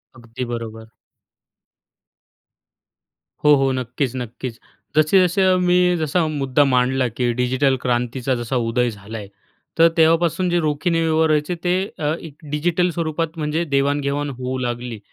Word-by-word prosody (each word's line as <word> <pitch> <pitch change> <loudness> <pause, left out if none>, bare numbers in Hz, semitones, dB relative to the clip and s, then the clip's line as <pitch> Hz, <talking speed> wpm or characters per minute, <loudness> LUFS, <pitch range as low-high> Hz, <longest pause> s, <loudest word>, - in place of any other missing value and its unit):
अगदी 120 +2 -7
बरोबर. 110 -1 -6 2.5
हो, 150 0 +7
हो. 135 -1 +2
नक्कीच, 130 +1 -2
नक्कीच, 120 0 -6 0.4
जसे-जसे 180 +4 +4 0.2
मी 180 0 +4 0.2
जसा 160 +2 0
मुद्दा 145 -2 +1
मांडला, 130 0 +2
की 120 +2 -1
डिजिटल 130 +2 +1
क्रांतीचा 125 +1 -1
जसा 120 +2 -3
उदय 120 +1 +1
झालाय, 105 0 -8 0.5
तर 165 - +8
तेव्हापासून 165 +2 +3
जे 175 0 +2
रोखीने 160 +2 0
व्यवहार 160 0 +2
व्हायचे 150 +3 +1
ते 175 0 +2 0.5
एक 145 - -13 0.2
डिजिटल 175 +4 +1
स्वरूपात 165 0 -3
म्हणजे 155 +2 -1
देवाण-घेवाण 140 0 0
होऊ 130 0 -4
लागली. 120 -2 -4
140 Hz, 125 wpm, -21 LUFS, 125-160 Hz, 2.5 s, तर